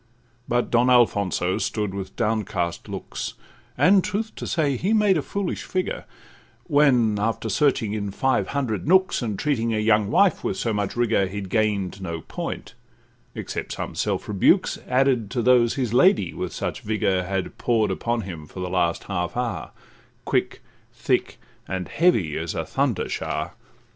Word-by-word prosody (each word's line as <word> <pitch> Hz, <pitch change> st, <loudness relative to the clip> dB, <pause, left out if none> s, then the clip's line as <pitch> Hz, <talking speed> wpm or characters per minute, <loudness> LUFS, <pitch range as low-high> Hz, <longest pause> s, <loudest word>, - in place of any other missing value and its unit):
But 120 Hz, 0 st, 0 dB
Don 120 Hz, +1 st, +4 dB
Alfonso 100 Hz, -7 st, +2 dB
stood 105 Hz, -3 st, -2 dB
with 95 Hz, -1 st, -6 dB
downcast 105 Hz, -7 st, -1 dB
looks, -, -, -5 dB, 0.4 s
And, 190 Hz, 0 st, +5 dB
truth 220 Hz, +2 st, -3 dB
to -, -, -5 dB
say, 145 Hz, -5 st, +1 dB
he 190 Hz, -, 0 dB
made 210 Hz, -3 st, +4 dB
a 155 Hz, -, +1 dB
foolish 195 Hz, +5 st, -3 dB
figure; 185 Hz, 0 st, -3 dB, 0.6 s
When, 130 Hz, -, +3 dB
after 110 Hz, +1 st, -1 dB
searching 115 Hz, -2 st, +1 dB
in 100 Hz, -2 st, -2 dB
five 130 Hz, +7 st, 0 dB
hundred 130 Hz, -6 st, -2 dB
nooks, 185 Hz, -1 st, +4 dB
And 110 Hz, -5 st, -2 dB
treating 115 Hz, -5 st, 0 dB
a -, -, 0 dB
young 105 Hz, -1 st, +3 dB
wife 200 Hz, -, +3 dB
with 95 Hz, -, -2 dB
so 115 Hz, -, -1 dB
much 105 Hz, -1 st, -2 dB
rigour, 115 Hz, -5 st, +2 dB
He 100 Hz, +2 st, -5 dB
gain'd 100 Hz, -1 st, -1 dB
no 85 Hz, -3 st, -4 dB
point, -, -, -6 dB, 0.6 s
except -, -, -4 dB
some -, -, -5 dB
self -, -, -2 dB
rebukes, 100 Hz, -3 st, +3 dB
Added 125 Hz, -4 st, +2 dB
to 120 Hz, 0 st, -1 dB
those 120 Hz, -1 st, +4 dB
his 125 Hz, -5 st, -1 dB
lady 180 Hz, -, +4 dB
with -, -, -4 dB
such -, -, -4 dB
vigour 100 Hz, -3 st, 0 dB
Had 95 Hz, +1 st, -4 dB
pour'd 115 Hz, -3 st, +2 dB
upon 120 Hz, 0 st, -1 dB
him 85 Hz, -6 st, -8 dB
for 95 Hz, -, -10 dB
the 90 Hz, -1 st, -3 dB
last 85 Hz, -2 st, +1 dB
half 90 Hz, +1 st, -3 dB
hour, 125 Hz, -2 st, -2 dB, 0.6 s
Quick, -, -, -1 dB, 0.3 s
thick, -, -, -1 dB, 0.3 s
and 95 Hz, -2 st, -3 dB
heavy—as 85 Hz, -, +1 dB
a -, -, -2 dB
thunder -, -, 0 dB
shower. -, -, -3 dB
110 Hz, 160 wpm, -24 LUFS, 95-130 Hz, 0.6 s, And